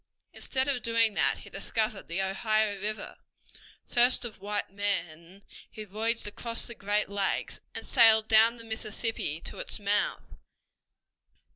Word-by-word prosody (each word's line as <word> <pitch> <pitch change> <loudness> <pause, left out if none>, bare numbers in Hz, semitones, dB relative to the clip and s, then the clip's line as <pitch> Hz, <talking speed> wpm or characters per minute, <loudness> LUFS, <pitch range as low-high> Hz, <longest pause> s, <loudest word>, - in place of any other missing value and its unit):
Instead 260 0 -1
of 270 -3 0
doing 230 -1 +2
that - - +2
he - - -12
discovered 215 -2 -2
the 175 +3 -2
Ohio 210 +1 0
River, 215 +1 -4 0.7
first 245 0 +4
of 225 - -7
white 205 0 -3
men 190 -2 -4 0.3
he 215 - -8
voyaged 220 +3 -2
across 230 +3 -2
the 235 - -7
Great 210 -1 0
Lakes 200 -1 -1 0.2
and - - -5
sailed 220 -1 +5
down 225 +2 +5
the 230 - -10
Mississippi 220 -6 -3
to - - -7
its - - 0
mouth. 205 -1 0
215 Hz, 140 wpm, -29 LUFS, 200-230 Hz, 0.7 s, sailed